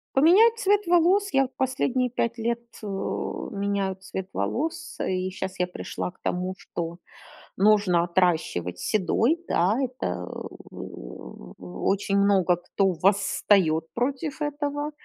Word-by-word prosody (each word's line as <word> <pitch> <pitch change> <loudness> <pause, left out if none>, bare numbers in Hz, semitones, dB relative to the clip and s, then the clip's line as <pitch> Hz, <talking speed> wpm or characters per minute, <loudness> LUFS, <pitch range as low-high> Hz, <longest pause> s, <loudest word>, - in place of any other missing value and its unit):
Поменять 415 +11 +6
цвет 410 -2 +2
волос. 360 +4 +4
Я 270 -1 +4
последние 255 -1 0
5 235 0 -1
лет, 235 +1 -1 0.2
у 195 -2 -4
меняю 200 -1 0
цвет 190 0 -6
волос, 330 +5 -3
и 185 0 -1
щас 190 0 -6
я 180 - +3
пришла 180 - -5
к 180 - -29
тому, 180 +1 -2
что 170 0 -5 0.6
нужно 200 -4 +4
отращивать 170 - 0
седой, 225 - +1
да, 185 +7 +2
это 250 - -3 0.5
у - - -9 0.2
у 90 0 -5
очень 200 0 +1
много 195 -3 +4
кто 190 +2 0
восстает 190 -3 +2
против 275 +5 -2
этого. 290 0 -2
200 Hz, 125 wpm, -26 LUFS, 180-270 Hz, 0.6 s, Поменять